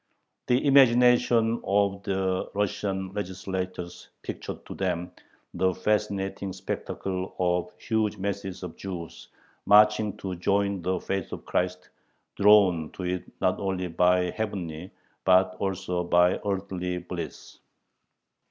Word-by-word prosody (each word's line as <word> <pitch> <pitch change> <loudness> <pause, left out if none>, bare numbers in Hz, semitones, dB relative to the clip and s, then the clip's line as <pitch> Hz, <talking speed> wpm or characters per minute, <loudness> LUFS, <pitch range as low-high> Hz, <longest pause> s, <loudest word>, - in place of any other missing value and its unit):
The 125 +4 +2
imagination 125 -3 +5
of 100 0 +1
the 95 -1 -1
Russian 95 -1 -2
legislators 95 -2 -5
pictured - - -6
to - - -7
them 90 -2 -2 0.4
the 95 -1 +1
fascinating 100 -1 -1
spectacle 95 0 -4
of 90 -1 +1
huge 110 0 0
masses 95 -1 -4
of 90 -3 -6
Jews 90 -4 -7 0.4
marching 105 0 +5
"to 95 -2 -4
join 100 +1 +1
the 95 +2 -1
faith 95 0 -3
of - - -7
Christ," 90 0 -2 0.5
drawn 100 -6 +5
to 95 - -7
it 90 0 -3
not - - +2
only 95 -2 -2
by 90 +1 +3
heavenly, 90 -6 -4 0.3
but 95 0 +4
also 95 -2 -2
by 90 +1 +3
earthly, 95 -3 -2
"bliss." 90 -2 -7
95 Hz, 115 wpm, -27 LUFS, 90-100 Hz, 0.5 s, imagination